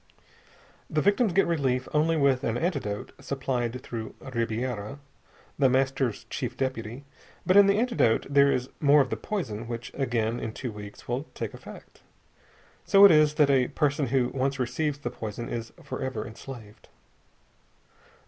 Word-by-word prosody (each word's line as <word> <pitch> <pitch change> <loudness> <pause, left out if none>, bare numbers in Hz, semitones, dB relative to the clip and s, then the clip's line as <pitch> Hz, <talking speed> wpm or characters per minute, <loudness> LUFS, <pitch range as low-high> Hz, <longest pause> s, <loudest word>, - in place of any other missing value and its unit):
The 155 - 0
victims 205 +2 +3
get 195 +3 +3
relief 130 -6 0
only 160 +2 +2
with 140 -2 +2
an 115 -1 0
antidote 135 - -2
supplied 125 -2 -2
through 110 -2 -6 0.2
Ribiera, 115 0 -2 0.6
The 135 -2 +5
Master's 130 -3 0
Chief - - -5
Deputy; 130 -1 -3 0.4
but 185 - +3
in 200 -1 +8
the 200 +1 +3
antidote 230 - +2
there 140 0 +5
is 125 +1 -2
more 145 0 +6
of 130 - -2
the - - +1
poison 120 - -4
which 120 0 -6
again 120 -4 -1
in 110 - -5
two 125 -1 -5
weeks 105 -1 -10
will 125 +5 -2
take - - -4
effect. - - -12 0.8
And - - -26
so 200 0 +8
it 200 - +9
is 150 -1 +4
that 150 -2 +4
a 130 -2 +3
person 145 -2 0
who 125 0 +1
once 135 +1 -1
receives 135 +4 -1
the 120 -4 -5
poison 115 0 -6
is 115 -1 -5
forever 130 -5 -4
enslaved. 110 -2 -11
130 Hz, 160 wpm, -27 LUFS, 115-150 Hz, 0.8 s, it